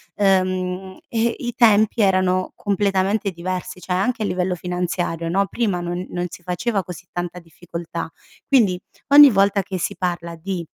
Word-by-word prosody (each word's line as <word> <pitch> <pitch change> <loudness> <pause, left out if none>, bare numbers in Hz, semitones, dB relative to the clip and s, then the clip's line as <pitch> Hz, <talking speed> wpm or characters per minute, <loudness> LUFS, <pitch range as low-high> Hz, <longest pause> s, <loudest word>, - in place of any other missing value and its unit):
ehm, 185 -1 0
e 230 0 0
i 240 -1 -4
tempi 220 -2 +4
erano 185 -2 +2
completamente 200 0 0
diversi, 180 +1 -5
cioè 180 - -3
anche 220 +6 0
a - - 0
livello 180 -1 -1
finanziario 175 -1 -2
no, 195 +3 +1
prima 205 -6 -1
non 175 +1 -4
non 175 0 -3
si 175 - -12
faceva 195 +4 -1
così 180 0 -10
tanta 175 0 -4
difficoltà. 170 0 -7 0.4
Quindi 220 -10 +3 0.4
ogni 290 0 +11
volta 200 -1 +3
che 190 0 -5
si 180 - -2
parla 170 -2 -3
di: 175 +1 -4
185 Hz, 155 wpm, -21 LUFS, 175-200 Hz, 0.4 s, ogni